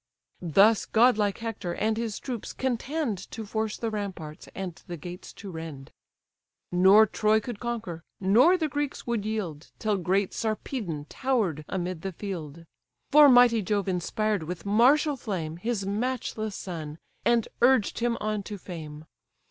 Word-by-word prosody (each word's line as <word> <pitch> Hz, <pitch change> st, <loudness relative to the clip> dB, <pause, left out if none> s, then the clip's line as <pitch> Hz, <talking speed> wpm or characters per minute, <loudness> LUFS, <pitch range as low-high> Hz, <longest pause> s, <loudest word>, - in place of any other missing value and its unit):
Thus 195 Hz, +6 st, +4 dB
godlike 220 Hz, -3 st, +3 dB
Hector 225 Hz, -6 st, -4 dB
and 220 Hz, +1 st, 0 dB
his 225 Hz, -2 st, -3 dB
troops 245 Hz, -5 st, -5 dB
contend 260 Hz, -, -2 dB
To 225 Hz, -1 st, -6 dB
force 220 Hz, +1 st, -2 dB
the 225 Hz, -1 st, -2 dB
ramparts, 185 Hz, -7 st, -6 dB
and 190 Hz, -2 st, -4 dB
the 175 Hz, -, -5 dB
gates 175 Hz, +4 st, -9 dB
to 200 Hz, -2 st, -9 dB
rend: 160 Hz, -5 st, -8 dB, 0.8 s
Nor 190 Hz, +5 st, +7 dB
Troy 215 Hz, +1 st, +2 dB
could 220 Hz, -1 st, -7 dB
conquer, 225 Hz, -9 st, -4 dB, 0.2 s
nor 240 Hz, -, +5 dB
the 320 Hz, -3 st, 0 dB
Greeks 290 Hz, -1 st, -3 dB
would 230 Hz, -3 st, -1 dB
yield, 180 Hz, -9 st, -4 dB
Till 215 Hz, -2 st, 0 dB
great 190 Hz, +2 st, 0 dB
Sarpedon 215 Hz, -, -3 dB
tower'd 215 Hz, -, 0 dB
amid 180 Hz, -2 st, -3 dB
the 195 Hz, -1 st, -4 dB
field; 170 Hz, -4 st, -6 dB, 0.5 s
For 295 Hz, 0 st, +9 dB
mighty 245 Hz, -3 st, +6 dB
Jove 200 Hz, 0 st, -1 dB
inspired 200 Hz, +3 st, 0 dB
with 170 Hz, +3 st, -6 dB
martial 265 Hz, +9 st, +4 dB
flame 170 Hz, -9 st, -4 dB
His 215 Hz, +1 st, -2 dB
matchless 220 Hz, -1 st, -2 dB
son, 160 Hz, -5 st, -6 dB, 0.3 s
and 235 Hz, -2 st, +3 dB
urged 245 Hz, -3 st, +4 dB
him 235 Hz, 0 st, 0 dB
on 215 Hz, -1 st, -1 dB
to 205 Hz, +1 st, -7 dB
fame. 155 Hz, -5 st, -8 dB
210 Hz, 150 wpm, -27 LUFS, 180-235 Hz, 0.8 s, For